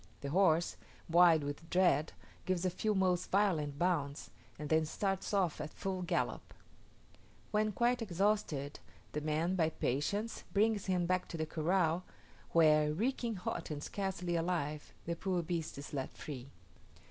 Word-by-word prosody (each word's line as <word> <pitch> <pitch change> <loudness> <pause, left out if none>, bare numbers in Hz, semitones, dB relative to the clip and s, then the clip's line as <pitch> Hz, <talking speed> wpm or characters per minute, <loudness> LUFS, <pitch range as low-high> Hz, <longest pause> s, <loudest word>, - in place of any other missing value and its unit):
The 140 - -4
horse, 170 -1 +3 0.3
wild 170 -2 +6
with 145 +3 -5
dread, 175 -4 +3 0.3
gives 185 -1 0
a 185 - +2
few 210 +4 0
most 185 -2 +1
violent 165 -8 +1
bounds, 150 -5 -1 0.3
and 150 - -5
then 160 +1 +3
starts 195 +4 -2
off 190 -5 +1
at 150 - -7
full 190 -1 -3
gallop: 175 -1 -2 1.0
when 215 0 +2
quite 240 +4 +1
exhausted, 190 -8 0 0.3
the 150 - -3
man, 155 +4 0
by 165 -4 +2
patience, 160 - -2
brings 210 0 +2
him 180 -2 +1
back 185 +1 0
to 165 - -6
the 160 - -1
corral, 165 +2 +1 0.5
where, 155 -2 +5
reeking 230 - -1
hot 180 - -4
and 150 -1 -4
scarcely 185 -3 -2
alive, 165 -3 -1
the 170 - -2
poor 180 0 -1
beast 165 -3 -3
is 140 +1 -8
let 135 -2 -4
free. 135 -3 -7
175 Hz, 150 wpm, -34 LUFS, 155-190 Hz, 1.0 s, wild